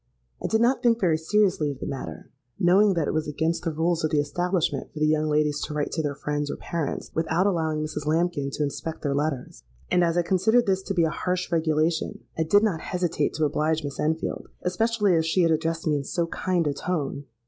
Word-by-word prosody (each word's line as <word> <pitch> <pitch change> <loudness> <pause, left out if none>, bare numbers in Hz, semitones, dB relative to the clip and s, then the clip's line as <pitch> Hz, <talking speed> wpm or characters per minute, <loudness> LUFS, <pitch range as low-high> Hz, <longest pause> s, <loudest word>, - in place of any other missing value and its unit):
—I - - -1
did 220 0 +2
not 245 +3 +3
think 235 -1 +3
very 175 -6 +3
seriously 185 -3 +2
of 140 - -5
the - - -5
matter, 135 - -6 0.3
knowing 190 +3 +4
that 165 -3 0
it - - -1
was 155 0 -1
against 160 +3 -1
the 165 - -1
rules 165 +2 0
of 155 - +2
the 150 - +2
establishment 175 +4 -1
for - - -13
the 155 - +2
young 155 0 +2
ladies 150 -1 +1
to 150 - -4
write 145 -1 -1
to 160 - -1
their 145 -2 -2
friends 145 +1 -2
or - - -2
parents 165 -4 -4
without 160 +3 +1
allowing 160 -5 0
Mrs. 150 -1 -5
Lambkin 160 -3 +1
to 150 - -1
inspect 155 +3 -4
their 140 -2 0
letters; 140 -3 -2 0.3
and 180 - +4
as 170 0 +1
I 175 - +3
considered 220 +7 +3
this 190 -1 +1
to 195 - -4
be 170 - +3
a 160 - +1
harsh 180 +1 -2
regulation, 160 0 0
I - - -1
did 205 +7 +4
not 190 -8 0
hesitate 175 -4 -1
to 155 - +1
oblige 155 +2 0
Miss 145 -1 -6
Enfield—especially 185 +6 0
as 160 0 +1
she 180 +3 +3
had 165 - +3
addressed 160 +1 -1
me 150 -2 +2
in 140 - -3
so 170 +4 -1
kind 175 0 -1
a 145 - +1
tone. 145 -3 -3
160 Hz, 225 wpm, -25 LUFS, 150-180 Hz, 0.3 s, knowing